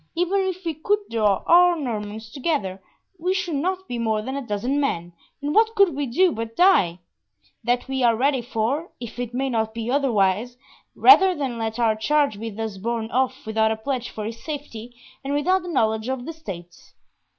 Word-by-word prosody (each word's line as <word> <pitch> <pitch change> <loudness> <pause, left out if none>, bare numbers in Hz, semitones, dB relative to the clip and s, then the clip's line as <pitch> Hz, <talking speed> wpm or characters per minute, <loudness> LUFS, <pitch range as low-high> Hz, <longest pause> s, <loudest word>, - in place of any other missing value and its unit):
Even 355 +4 +1
if 370 0 -5
we 330 - -1
could 360 +8 +1
draw 210 -4 +2
our 355 +1 +6
Normans 220 -6 -5
together, 250 - -2 0.4
we 365 +3 0
should 365 -3 -2
not 370 +5 -2
be 240 - -4
more 220 -2 0
than 265 +4 -4
a 280 - -2
dozen 245 +4 -1
men, 175 -11 -2 0.3
and 295 +1 -1
what 445 +2 +3
could 390 -7 +4
we 285 -1 -2
do 355 +9 +3
but 225 -2 -5
die? 345 - +4 0.7
That 245 +3 0
we 265 0 -2
are 235 -2 +4
ready 265 +2 +1
for, 250 +7 -2
if 235 0 -8
it 245 -2 -3
may 265 +2 -1
not 220 -3 -1
be 230 +1 -3
otherwise, 240 -3 +1 0.4
rather 385 -1 +7
than 265 -6 -3
let 220 0 -3
our 230 -2 +2
charge 280 -1 +1
be 225 +1 -4
thus 220 -2 -5
borne 230 +1 -3
off 260 +1 0
without 220 0 +2
a 220 - -1
pledge 245 +2 -3
for 215 - -6
his 230 +1 -7
safety, 245 -6 -7 0.3
and 280 +1 -2
without 370 +6 +2
the 360 - -9
knowledge 220 -7 0
of 260 -1 -3
the 330 - -5
states." 175 - -10
245 Hz, 195 wpm, -23 LUFS, 220-300 Hz, 0.7 s, rather